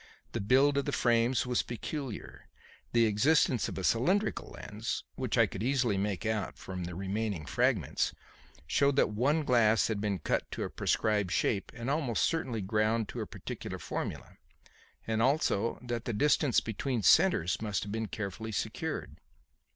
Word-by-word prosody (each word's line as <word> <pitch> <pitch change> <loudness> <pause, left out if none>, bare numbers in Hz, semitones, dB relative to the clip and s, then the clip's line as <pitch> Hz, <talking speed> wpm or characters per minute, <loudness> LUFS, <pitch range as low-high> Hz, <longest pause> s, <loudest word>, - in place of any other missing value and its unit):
The - - -3
build 135 +7 +4
of 140 - -2
the - - -1
frames 120 +1 +2
was 125 -1 +1
peculiar; 125 0 -6 0.4
the 115 -1 +4
existence 125 +3 +3
of - - -7
a 95 - -3
cylindrical 185 - +1
lens 110 +2 -4
which - - -2
I - - +6
could 95 - -6
easily 125 -3 +1
make 100 +1 -2
out 110 -3 -2
from 90 -2 -6
the 85 0 -6
remaining 100 -2 -2
fragments - - +1 0.5
showed 140 -1 +2
that 140 - +3
one 140 +9 +1
glass 115 -5 +3
had 105 -2 -1
been 105 -2 0
cut 75 - -1
to - - -3
a - - -4
prescribed 105 -3 +1
shape 95 +2 0
and 120 0 -6
almost 140 -5 +1
certainly 130 -9 -1
ground 110 +2 +1
to - - -5
a - - -4
particular - - -6
formula, - - -5 0.7
and 110 0 0
also 120 -5 +1
that 120 -1 -3
the 120 - -2
distance 145 +2 +3
between 115 +1 -2
centres 85 +1 +4
must 105 -3 -1
have 105 - -6
been 110 0 -2
carefully 105 +2 -5
secured. 105 - -3
115 Hz, 165 wpm, -31 LUFS, 105-130 Hz, 0.7 s, I